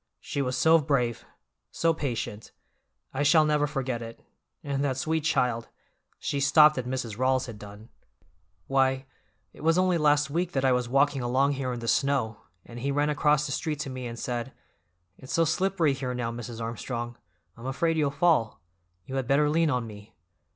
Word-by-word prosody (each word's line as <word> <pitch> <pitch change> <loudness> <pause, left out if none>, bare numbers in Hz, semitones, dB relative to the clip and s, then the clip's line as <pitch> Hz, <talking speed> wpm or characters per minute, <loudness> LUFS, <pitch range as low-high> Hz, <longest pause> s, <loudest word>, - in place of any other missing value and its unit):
She 140 - -3
was 130 -1 -1
so 160 +4 +5
brave, 130 -6 0 0.4
so 165 0 +1
patient; 115 -8 -4 0.6
I 135 - -2
shall 155 +2 +5
never 150 -1 +2
forget 130 -4 -3
it, 115 0 -8 0.4
and 140 -1 -2
that 135 -2 0
sweet 160 +3 0
child—" 125 -7 0 0.5
she 140 - -2
stopped 150 +2 +6
as 125 - -4
Mrs. 125 -4 -4
Rawls 130 0 +2
had 115 -4 -9
done. 105 +2 -12 0.8
"Why, 135 0 +1 0.5
it - - -14
was 165 +2 +3
only 185 -2 +2
last 150 -1 +3
week 175 +3 -1
that 135 -1 0
I 130 - +4
was 125 -1 0
walking 140 +1 +2
along 130 +3 +2
here 135 -2 -2
in 120 -1 -5
the 115 - -5
snow, 120 -6 +1 0.2
and 120 0 -9
he 135 +4 -2
ran 145 +2 +1
across 150 -1 +2
the 145 - -4
street 155 +2 -2
to 140 - -4
me 130 -1 -5
and 115 0 -7
said: 120 +1 -4 0.7
'It's 130 - -8
so 165 - +3
slippery 170 -2 +1
here 130 -2 -4
now, 120 -2 -2
Mrs. 120 0 -7
Armstrong, 120 +1 -4 0.4
I'm 115 +3 -8
afraid 165 +5 0
you'll 150 -3 +2
fall; 145 -7 +1 0.5
you 135 - -4
had 130 -2 -2
better 150 +2 +3
lean 165 0 +2
on 125 -4 0
me. 105 -5 -12
135 Hz, 185 wpm, -27 LUFS, 120-150 Hz, 0.8 s, stopped